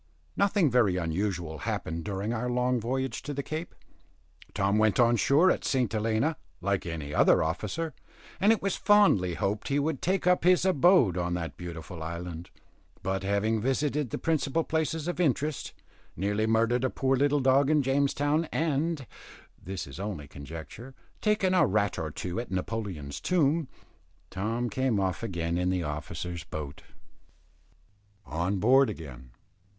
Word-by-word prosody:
Nothing 200 -7 +2
very 110 -7 +3
unusual 85 -2 -2
happened 80 +1 -3
during 100 +3 -2
our 120 +1 -2
long 125 0 +1
voyage 130 +3 -2
to 145 +1 -5
the 140 - -2
Cape. 160 +4 -5 0.8
Tom 100 +2 +2
went 110 +2 +3
on 120 0 +5
shore 140 - +4
at - - -2
St. 125 -6 0
Helena, 115 +8 0 0.2
like 100 0 -1
any 80 -3 -5
other - - +4
officer, 105 - -3 0.5
and 205 +3 +5
it 225 - +1
was 195 -2 0
fondly 195 - +4
hoped 105 +2 -2
he 140 - +1
would 145 -1 -1
take 185 +1 0
up 180 -2 +3
his 180 +1 +4
abode 175 - +4
on 90 0 -1
that 85 -2 -4
beautiful 85 -1 -8
island. 85 +1 -6 0.5
But 95 0 -1
having 100 +3 0
visited 140 +2 0
the - - -3
principal 160 -1 0
places 160 0 -1
of 175 - -3
interest, 150 -2 0 0.4
nearly 105 +4 0
murdered 115 +2 +2
a 130 - +2
poor 135 +1 +1
little 145 +2 +2
dog 135 +1 +4
in 150 -2 +3
James 135 +1 +1
Town, 145 +3 +1
and 155 -1 -1 0.6
this 95 0 -5
is 70 +5 -10
only 95 -8 -5
conjecture 80 - -9 0.3
taken 210 -3 +2
a 175 -6 +4
rat 100 0 0
or 80 - -3
two 85 +4 -4
at 120 - -5
Napoleon's 95 -7 -4
tomb, 160 -3 +2 0.6
Tom 115 +5 -2
came 125 -1 0
off 95 -2 -1
again 85 -5 -2
in 90 0 +1
the 90 -1 0
officers' 80 +3 -5
boat. 75 -2 -7 1.4
ON 85 +7 -1
BOARD 130 +6 +5
AGAIN. 65 - -8
115 Hz, 155 wpm, -28 LUFS, 90-145 Hz, 1.4 s, on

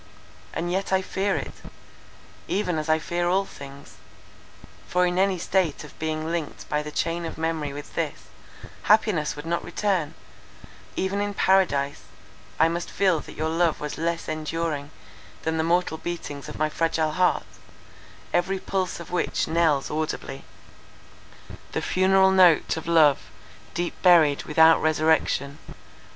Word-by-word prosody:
And 175 +1 -3
yet 195 +2 -2
I 190 0 +2
fear 195 +1 -1
it; - - -4 1.0
even 180 -5 0
as 155 +1 -5
I 155 - +4
fear 175 +2 -1
all 195 +2 +2
things; 140 - -12 0.9
for 180 0 +2
in 180 +1 0
any 190 -1 +2
state 175 -3 0
of - - -14
being 155 0 -2
linked 170 -3 -4
by 150 - 0
the 150 - -6
chain 165 +3 -2
of 165 - -6
memory 160 -3 -2
with 145 +1 -9
this, - - -3 0.6
happiness 205 -8 +3
would 145 +1 -8
not 170 +1 -1
return—even 190 +1 -4
in 205 0 -2
Paradise, 155 -9 +2 0.6
I 160 - +6
must 170 +1 -3
feel 185 -5 +2
that - - -11
your 155 +1 -1
love 165 0 +1
was 150 +1 -5
less 170 0 -2
enduring 155 -1 -3 0.5
than 160 0 -1
the 160 - +1
mortal 170 -1 +1
beatings 155 -5 -6
of - - -8
my 155 - +1
fragile 160 0 0
heart, 180 +3 +1 0.9
every 190 +2 +1
pulse 190 -2 -2
of 170 - -10
which 180 - 0
knells 160 -4 +1
audibly, 150 -3 -4 1.3
The - - -1
funeral 190 +1 +4
note 180 -4 +5
Of 160 0 -7
love, 155 -4 +5 0.6
deep 175 0 -2
buried, 165 -6 +5
without 160 +1 +5
resurrection. 155 -2 +1
165 Hz, 145 wpm, -25 LUFS, 155-180 Hz, 1.3 s, I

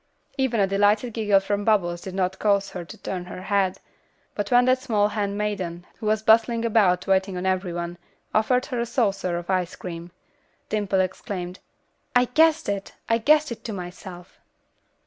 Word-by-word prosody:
Even 265 -5 0
a 200 - +5
delighted 205 +4 +2
giggle 210 -3 +3
from 205 +1 -2
Bubbles 175 -5 +1
did 190 -1 -7
not 190 0 -1
cause 200 -2 +2
her 180 - -5
to 165 - -11
turn 180 -2 -5
her 185 0 -8
head, 195 -1 +1 0.6
but 205 -1 -3
when 245 0 +5
that 255 0 +3
small 210 -5 +1
hand 205 -1 -2
maiden, 185 -5 -3
who 220 - -4
was 215 0 +1
bustling 230 +1 +4
about 205 -6 +3
waiting 190 -1 +1
on 180 - -4
every 185 -1 0
one, 170 +1 -5 0.3
offered 250 +4 +2
her 250 -4 -3
a 235 - 0
saucer 195 -7 0
of 175 0 -6
ice 185 -2 0
cream, 170 -1 -7 0.6
Dimple 200 -3 +1
exclaimed, 185 -1 -4 0.6
"I 245 0 +5
guessed 315 +5 +3
it! 200 -1 -3
I 230 0 +2
guessed 300 +4 +3
it 235 - -7
to 225 - -4
myself." 180 -1 -9
200 Hz, 180 wpm, -24 LUFS, 185-225 Hz, 0.6 s, a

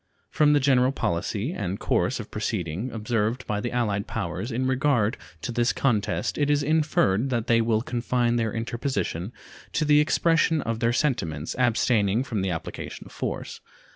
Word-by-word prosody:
From 150 -1 +4
the 145 - +5
general 130 -2 +3
policy 105 - -2
and 100 - -3
course - - 0
of - - -8
proceeding 90 +9 -3
observed 115 +2 -1
by 105 -1 -2
the 120 - -3
allied 105 -5 -1
powers 90 +8 -3
in 125 +3 -1
regard 130 -4 +2 0.3
to 120 - -2
this 120 +1 +2
contest 115 -1 0
it 145 0 +2
is 145 -1 +2
inferred 140 -7 +2
that 120 -3 -1
they 115 -1 +3
will 115 -1 +1
confine 120 -1 0
their 115 -2 0
interposition 115 -5 -3 0.4
to 155 - +1
the 150 0 +5
expression 165 +1 +3
of 115 0 -2
their 115 0 +2
sentiments, 85 - -1
abstaining 115 -2 +2
from 110 -7 -3
the 95 - -1
application 80 -3 -6
of - - -13
force. - - -5
120 Hz, 170 wpm, -25 LUFS, 105-135 Hz, 0.4 s, the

